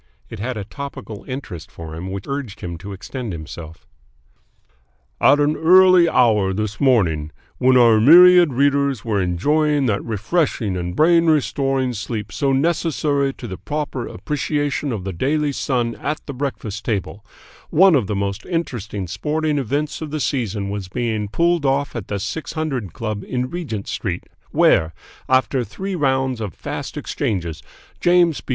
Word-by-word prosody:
It - - -7
had 120 +3 -3
a 105 - -4
topical 110 -3 -8
interest 90 - -7
for 80 -2 -9
him 90 +3 -6
which 95 +1 -5
urged 140 -7 -5
him 85 -3 -5
to 100 +3 -8
extend 110 +3 -6
himself. 80 +1 -9 1.3
"At 145 - +5
an 145 +1 +2
early 185 0 +6
hour 105 -6 +3
this 105 0 -3
morning, 85 - +2 0.3
when 130 0 +5
our 115 -3 +6
myriad 175 +4 +8
readers 140 -2 +1
were 105 -3 0
enjoying 145 - +1
that 105 -4 0
refreshing 110 - -1
and 90 0 -4
brain 165 - +4
restoring 135 -4 +1
sleep 110 -2 -5
so 135 +8 0
necessary 145 -1 +1
to 120 - -8
the 95 - -6
proper 145 -4 -4
appreciation 145 -1 -2
of 105 -6 -4
the 95 0 -4
Daily 145 - 0
Sun 125 -4 -1
at 150 +1 -3
the 140 - -6
breakfast 125 -6 -4
table, 105 -2 -3 0.5
one 190 +3 +6
of 125 -9 +2
the 105 - -2
most 100 0 -2
interesting 120 - -3
sporting 150 - -1
events 145 +5 -2
of 155 - -4
the 155 +1 -3
season 110 -7 -2
was 100 -2 -4
being 110 +1 -2
pulled 170 +8 +1
off 140 0 0
at 110 -5 -5
the 100 - -2
Six 155 +11 -5
Hundred 140 - -3
Club 110 -4 -4
in 125 0 -3
Regent 140 - -5
Street, 90 -4 -3 0.3
where, 80 0 +3 0.3
after 130 0 +2
three 190 - -6
rounds 130 -6 0
of 100 -7 -5
fast - - -6
exchanges, 85 -6 -3 0.4
James 175 -3 +3
B. - - -25
125 Hz, 160 wpm, -20 LUFS, 100-145 Hz, 1.3 s, myriad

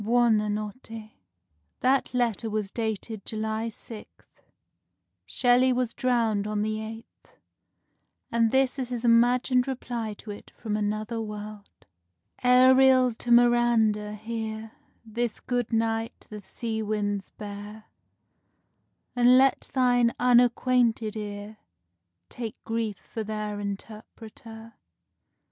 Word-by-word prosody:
Buona 225 -2 +3
Notte." 215 +1 -6 0.7
That 265 +1 +2
letter 235 -3 0
was 210 -2 -3
dated 220 -2 -4
July 220 +1 -3
6th; 225 0 -12 0.9
Shelley 250 +1 +4
was 250 -2 0
drowned 225 -5 0
on 210 0 -1
the 215 0 -2
8th; 225 +1 -10 1.0
and 230 -1 +3
this 265 +2 +1
is 255 -2 -3
his 245 -1 -4
imagined 245 +2 +3
reply 240 -4 -4
to 210 - -9
it 205 - -10
from 215 -2 -3
another 215 +2 -2
world: 210 -1 -9 0.6
Ariel 255 0 +6
to 240 +2 -5
Miranda: 235 -3 +3
hear 220 0 -5 0.3
This 230 +1 -3
good 245 -2 -2
night 225 0 -1
the 210 -1 -7
sea 220 +2 -4
winds 205 -2 -2
bear; 210 +1 -9 1.3
And 245 +1 +6
let 270 0 +3
thine 245 -2 +3
unacquainted 245 -2 +3
ear 205 0 -6 0.7
Take 230 -3 -6
grief 225 -3 -2
for 220 +2 -7
their 210 -1 -4
interpreter. 220 +2 -9
225 Hz, 110 wpm, -26 LUFS, 215-245 Hz, 1.3 s, Ariel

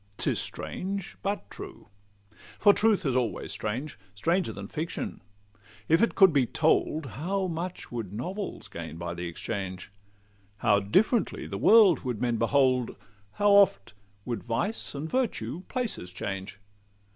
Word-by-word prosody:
'Tis - - +1
strange,—but 195 - -3
true; - - -10 0.7
for 205 -1 +6
truth 210 -4 +2
is 135 -3 +1
always 125 -3 -1
strange; 125 +7 -4 0.2
Stranger 170 - +1
than - - -7
fiction; 165 +2 -4 0.7
if 165 +2 +4
it 230 - +2
could 190 -5 +7
be 135 -4 +3
told, 155 +1 +1
How 190 +8 -2
much 175 +1 -5
would 115 -6 -4
novels 185 - -5
gain 80 -1 -7
by 85 0 -4
the 85 0 -5
exchange! 95 +1 -5 0.7
How 100 -1 +3
differently 200 - +1
the - - -5
world 210 -7 +7
would 125 -5 -4
men 120 -2 0
behold! 130 +1 +2 0.4
How 205 0 +3
oft 195 - +4 0.3
would 120 -4 -3
vice 135 - -2
and 145 +3 -4
virtue 180 - -1
places 235 - -3
change! 95 +2 -5
140 Hz, 135 wpm, -28 LUFS, -, 0.7 s, could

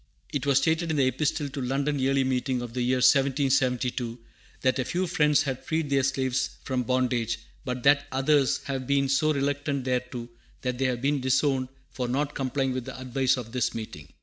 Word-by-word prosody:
It 140 -1 -2
was 140 -2 +4
stated 160 +4 +1
in 160 - 0
the 135 - +4
Epistle 145 +3 0
to 140 0 -5
London 140 +3 -1
Yearly 135 +1 +2
Meeting 130 -1 -1
of 120 -1 -7
the 125 - -2
year 125 +1 +2
1772, 130 -2 +2 0.4
that 130 0 +2
a - - +2
few 180 +8 -1
Friends 150 -4 +3
had 135 -4 -4
freed 160 -3 -2
their 135 -1 +4
slaves 130 0 -1
from 130 -2 -1
bondage, 125 -2 0 0.3
but 125 -1 -4
that 140 +1 +4
others 135 +1 +2
"have 135 -2 -4
been 140 -1 +2
so 140 +3 +2
reluctant 140 -1 -1
thereto 125 -1 -2 0.4
that 125 -1 -2
they 135 - +1
have 125 -1 -1
been 140 0 +1
disowned 130 0 +1 0.2
for 125 -2 -3
not 140 +4 -1
complying 135 0 -1
with 130 -2 -4
the - - -7
advice 130 +1 +1
of 115 -3 -6
this 125 -1 -1
meeting." 75 -11 -7
130 Hz, 195 wpm, -27 LUFS, 125-140 Hz, 0.4 s, was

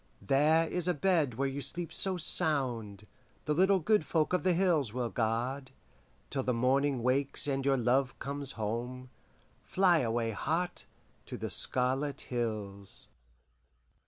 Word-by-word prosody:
There 150 +9 +3
is 180 0 +2
a 180 - +1
bed 155 -6 +1
where 135 +3 0
you 135 +1 -4
sleep 165 +6 -5
so 190 -1 0
sound, 125 - 0 0.4
The 150 - +1
little 190 +5 +4
good 210 +1 +2
folk 155 +2 0
of 180 - +2
the 185 -1 +2
hills 170 - +2
will 120 0 -3
guard, 125 +4 -2 0.6
Till 135 - -1
the 125 -2 -1
morning 130 +1 +1
wakes 135 +2 +1
and 135 -1 -1
your 135 0 +2
love 130 +2 +1
comes 140 -1 -5
home. 120 +4 -4 0.5
(Fly 180 -3 +3
away, 115 -2 -1
heart, 165 - -2 0.4
to - - -6
the - - -3
Scarlet 135 +3 +1
Hills!)" 105 -5 -1
135 Hz, 145 wpm, -31 LUFS, 120-160 Hz, 0.6 s, little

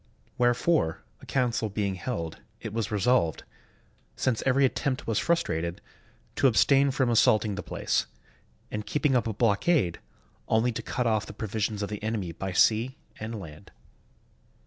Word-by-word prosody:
Wherefore, 120 - +1 0.2
a - - -14
council 120 -4 0
being 100 -1 -1
held, 85 -4 -4 0.2
it 110 - -6
was 110 -2 -1
resolved, 105 - +1 0.7
since 125 -4 0
every 135 +1 +4
attempt 130 0 -1
was 110 -2 0
frustrated, 85 - 0 0.6
to 135 - +5
abstain 135 +3 +4
from 130 -2 +1
assaulting 110 -2 +4
the 100 - -4
place, 60 - -1 0.6
and 105 0 -3
keeping 150 +2 +1
up 120 -3 +2
a 110 - -2
blockade, 115 - +2 0.5
only 110 +2 +2
to 110 - -4
cut 125 - -2
off 110 -2 +1
the - - -8
provisions 105 0 -2
of 100 - -3
the 105 - -5
enemy 105 -5 -2
by 95 +3 -5
sea 115 +8 +3 0.2
and 110 0 -5
land. 80 0 -11
110 Hz, 150 wpm, -27 LUFS, 100-125 Hz, 0.7 s, to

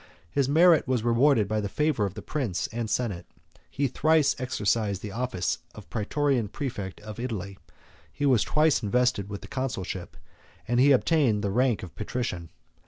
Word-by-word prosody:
His 140 -2 +1
merit 165 0 +5
was 125 -4 0
rewarded 120 -2 +3
by 110 +1 -1
the 100 - -3
favor 150 -4 +1
of 95 - -9
the 105 - -7
prince 110 - -2
and 115 -1 -3
senate: 105 -9 -2 0.4
he 140 - -1
thrice 155 +2 +3
exercised 105 -5 -1
the 105 - -5
office 110 -5 -2 0.2
of - - -11
Prætorian 125 0 0
præfect 105 -8 -5
of 110 +1 -9
Italy; 100 -6 -5 0.5
he 145 - -3
was 130 -6 +4
twice 155 -2 +2
invested 120 -2 +1
with 100 -1 -6
the - - -10
consulship, 130 -8 -4 0.5
and 120 +1 +1
he 140 +3 +6
obtained 130 -6 +3
the 100 - 0
rank 125 +1 +1
of 90 - -9
patrician. 105 -7 -4
120 Hz, 170 wpm, -27 LUFS, 105-135 Hz, 0.5 s, he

